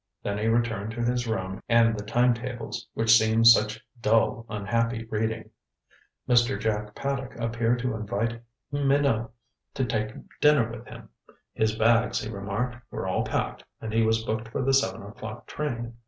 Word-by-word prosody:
Then 100 Hz, 0 st, -2 dB
he 110 Hz, -, 0 dB
returned 115 Hz, -2 st, 0 dB
to 120 Hz, -1 st, -3 dB
his 120 Hz, 0 st, 0 dB
room 95 Hz, -4 st, -3 dB
and 115 Hz, -1 st, +5 dB
the 105 Hz, -, -5 dB
time 120 Hz, +3 st, +3 dB
tables, 120 Hz, -1 st, -6 dB
which 115 Hz, 0 st, +5 dB
seemed 110 Hz, 0 st, +3 dB
such 110 Hz, -1 st, +5 dB, 0.2 s
dull 115 Hz, +1 st, +2 dB
unhappy 115 Hz, +3 st, -1 dB
reading. 110 Hz, 0 st, -2 dB, 0.8 s
Mr. 120 Hz, -2 st, +3 dB
Jack 105 Hz, -1 st, -2 dB
Paddock 135 Hz, -3 st, -3 dB
appeared 115 Hz, +1 st, +1 dB
to 125 Hz, -, 0 dB
invite 110 Hz, +2 st, -2 dB, 0.3 s
Minot 140 Hz, -5 st, +2 dB, 0.5 s
to 130 Hz, -, 0 dB
take 110 Hz, -2 st, -2 dB, 0.2 s
dinner 145 Hz, -6 st, +4 dB
with 120 Hz, 0 st, -9 dB
him. 115 Hz, -1 st, -11 dB, 0.4 s
His 110 Hz, 0 st, +1 dB
bags, 115 Hz, +2 st, +3 dB
he 110 Hz, -, -5 dB
remarked, 105 Hz, +5 st, -3 dB
were -, -, -4 dB
all -, -, 0 dB
packed, -, -, -2 dB, 0.2 s
and 110 Hz, -1 st, -5 dB
he 115 Hz, -, +3 dB
was 110 Hz, 0 st, +2 dB
booked 110 Hz, 0 st, -3 dB
for 115 Hz, -, -3 dB
the 135 Hz, +1 st, +2 dB
seven 100 Hz, -9 st, +1 dB
o'clock 110 Hz, +3 st, -8 dB
train. 120 Hz, -6 st, -4 dB
115 Hz, 165 wpm, -27 LUFS, 110-120 Hz, 0.8 s, and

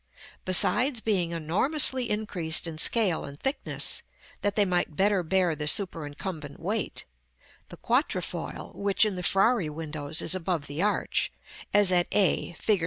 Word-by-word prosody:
Besides 210 Hz, +8 st, +4 dB
being 195 Hz, -6 st, 0 dB
enormously 240 Hz, -, +1 dB
increased 185 Hz, -8 st, -1 dB
in 160 Hz, -2 st, -5 dB
scale 195 Hz, -4 st, +3 dB
and 140 Hz, +1 st, -9 dB
thickness, 270 Hz, +2 st, 0 dB, 0.4 s
that 205 Hz, -1 st, -1 dB
they 205 Hz, -, +4 dB
might 175 Hz, -4 st, -1 dB
better 195 Hz, +1 st, +2 dB
bear 180 Hz, -1 st, +1 dB
the 150 Hz, 0 st, -4 dB
superincumbent 155 Hz, -3 st, -2 dB
weight, 200 Hz, +5 st, -3 dB, 0.6 s
the -, -, -11 dB
quatrefoil, -, -, -2 dB
which 200 Hz, +1 st, +2 dB
in 210 Hz, -, -1 dB
the 180 Hz, -, -5 dB
Frari 195 Hz, -1 st, +2 dB
windows 150 Hz, 0 st, -4 dB
is 170 Hz, -, +3 dB
above 180 Hz, -4 st, -1 dB
the 145 Hz, +3 st, -4 dB
arch, 210 Hz, +1 st, 0 dB, 0.4 s
as 205 Hz, -2 st, +4 dB
at 175 Hz, -1 st, +3 dB
a, 190 Hz, -3 st, +2 dB
Fig. 205 Hz, +4 st, 0 dB
185 Hz, 145 wpm, -27 LUFS, 160-205 Hz, 0.6 s, Besides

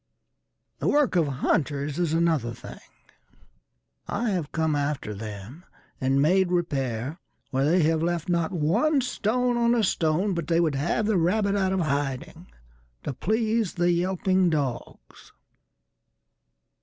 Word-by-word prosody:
The -, -, -1 dB
work 290 Hz, -8 st, +2 dB
of 165 Hz, -4 st, +3 dB
hunters 140 Hz, +2 st, -1 dB
is 170 Hz, -3 st, +1 dB
another 160 Hz, -8 st, +1 dB
thing:I 85 Hz, -, -9 dB
have 170 Hz, -6 st, -2 dB
come 160 Hz, -2 st, 0 dB
after 140 Hz, -6 st, -2 dB
them 105 Hz, -, -8 dB, 0.4 s
and 135 Hz, +1 st, +2 dB
made 185 Hz, +6 st, +3 dB
repairWhere 140 Hz, -6 st, -2 dB, 0.4 s
they 150 Hz, +7 st, +3 dB
have 160 Hz, +1 st, +2 dB
left 170 Hz, -1 st, -1 dB
not 170 Hz, -2 st, 0 dB
one 210 Hz, -, +2 dB
stone 245 Hz, +1 st, 0 dB
on 235 Hz, 0 st, +3 dB
a 230 Hz, -, +2 dB
stone, 180 Hz, +2 st, +1 dB
But 170 Hz, -3 st, -3 dB
they 170 Hz, -1 st, +2 dB
would 165 Hz, -4 st, +2 dB
have 165 Hz, +9 st, 0 dB
the 210 Hz, -2 st, +2 dB
rabbit 200 Hz, +4 st, +1 dB
out 190 Hz, -2 st, +1 dB
of 190 Hz, -1 st, 0 dB
hiding, 145 Hz, +3 st, -3 dB, 0.6 s
To -, -, -3 dB
please 220 Hz, -, 0 dB
the 175 Hz, 0 st, +2 dB
yelping 185 Hz, +1 st, +1 dB
dogs. 140 Hz, -7 st, -5 dB
170 Hz, 130 wpm, -26 LUFS, 140-190 Hz, 0.6 s, of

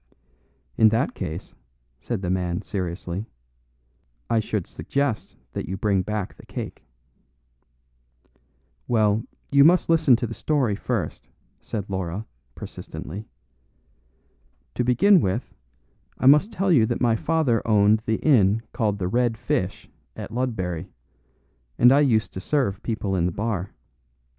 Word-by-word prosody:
"In 110 Hz, -, +7 dB
that 115 Hz, +5 st, 0 dB
case," 80 Hz, +4 st, -6 dB, 0.5 s
said 105 Hz, -, -4 dB
the 90 Hz, -, -1 dB
man 90 Hz, -2 st, -1 dB
seriously, 90 Hz, +1 st, -4 dB, 1.0 s
"I 115 Hz, -, +4 dB
should 105 Hz, -4 st, -2 dB
suggest 140 Hz, -6 st, -2 dB, 0.2 s
that -, -, -4 dB
you 95 Hz, -, -3 dB
bring 100 Hz, -1 st, +1 dB
back 105 Hz, 0 st, -3 dB
the -, -, -16 dB
cake." -, -, -7 dB, 2.0 s
"Well, 110 Hz, -2 st, +2 dB, 0.3 s
you 140 Hz, 0 st, +6 dB
must 175 Hz, +4 st, +4 dB
listen 160 Hz, -6 st, +5 dB
to 120 Hz, -, -2 dB
the 115 Hz, -, -5 dB
story 130 Hz, -6 st, 0 dB
first," 105 Hz, -6 st, -3 dB, 0.3 s
said 105 Hz, -2 st, -5 dB
Laura, 95 Hz, +2 st, -3 dB, 0.3 s
persistently. 100 Hz, +7 st, -8 dB, 1.5 s
"To -, -, 0 dB
begin 170 Hz, -, +5 dB
with, 95 Hz, -1 st, -2 dB, 0.6 s
I -, -, -3 dB
must 150 Hz, -, +6 dB
tell 195 Hz, -3 st, 0 dB
you 120 Hz, -9 st, +5 dB
that -, -, -2 dB
my 120 Hz, -2 st, +3 dB
father 140 Hz, -3 st, +1 dB
owned 105 Hz, 0 st, +4 dB
the 110 Hz, 0 st, +1 dB
inn 115 Hz, -7 st, +4 dB
called 105 Hz, -3 st, 0 dB
the 90 Hz, -2 st, -2 dB
'Red 120 Hz, +2 st, +1 dB
Fish' 95 Hz, -3 st, -2 dB, 0.3 s
at -, -, -7 dB
Ludbury, 95 Hz, -8 st, -2 dB, 0.9 s
and 125 Hz, +1 st, +7 dB
I 140 Hz, -, +6 dB
used 120 Hz, -7 st, +2 dB
to 95 Hz, -, -6 dB
serve 125 Hz, -7 st, 0 dB
people 105 Hz, -4 st, -2 dB
in 85 Hz, -1 st, +1 dB
the -, -, -1 dB
bar." 100 Hz, -1 st, -3 dB
110 Hz, 135 wpm, -24 LUFS, 95-125 Hz, 2.0 s, In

